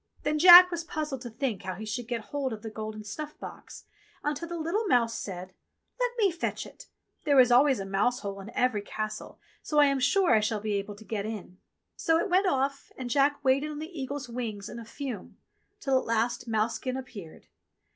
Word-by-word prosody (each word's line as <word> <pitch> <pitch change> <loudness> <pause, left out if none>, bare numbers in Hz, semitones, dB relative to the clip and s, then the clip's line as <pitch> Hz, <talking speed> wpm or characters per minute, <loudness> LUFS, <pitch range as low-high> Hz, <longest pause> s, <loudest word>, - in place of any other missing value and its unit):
Then 305 +1 0
Jack 360 +2 +10
was 340 -1 -3
puzzled 300 -5 -4
to 245 - -6
think 230 -3 -3
how 185 -1 -5
he 215 +4 -7
should 220 +2 -4
get 235 -2 -2
hold 275 -4 -2
of 215 0 -9
the 220 - -6
golden 215 0 -6
snuff 300 +9 -7
box, - - -10 0.4
until 295 +3 -2
the 340 0 -5
little 355 +7 -1
mouse 235 -7 +3
said: 185 -3 -6 0.5
"Let - - +2
me 405 -5 +3
fetch 335 0 -3
it. - - -14 0.4
There 285 -3 +4
is 250 -1 +6
always 265 +1 +5
a 195 - -4
mouse 205 +6 0
hole 200 -1 -5
in 200 - -9
every 250 -5 +1
castle, 215 +1 -6 0.2
so 300 - -3
I 295 - +8
am 275 -1 +1
sure 360 +5 +3
I 220 - +6
shall 215 0 -1
be 210 0 -2
able 200 +1 -3
to 220 +2 -14
get 210 -1 -3
in." 195 -4 -7 0.4
So 325 0 +2
it 380 +3 -1
went 375 +2 +4
off, 275 -3 -1
and 250 -2 -5
Jack 285 +1 +2
waited 275 +3 +3
on 300 - -6
the 315 0 -6
eagle's 280 0 -4
wings 225 -4 -5
in 235 - -7
a 230 - -9
fume; 245 -4 -7 0.4
till 270 -8 +2
at - - -7
last 235 +2 0
mousekin 230 +4 -1
appeared. 205 -11 -10
250 Hz, 215 wpm, -28 LUFS, 215-295 Hz, 0.5 s, Jack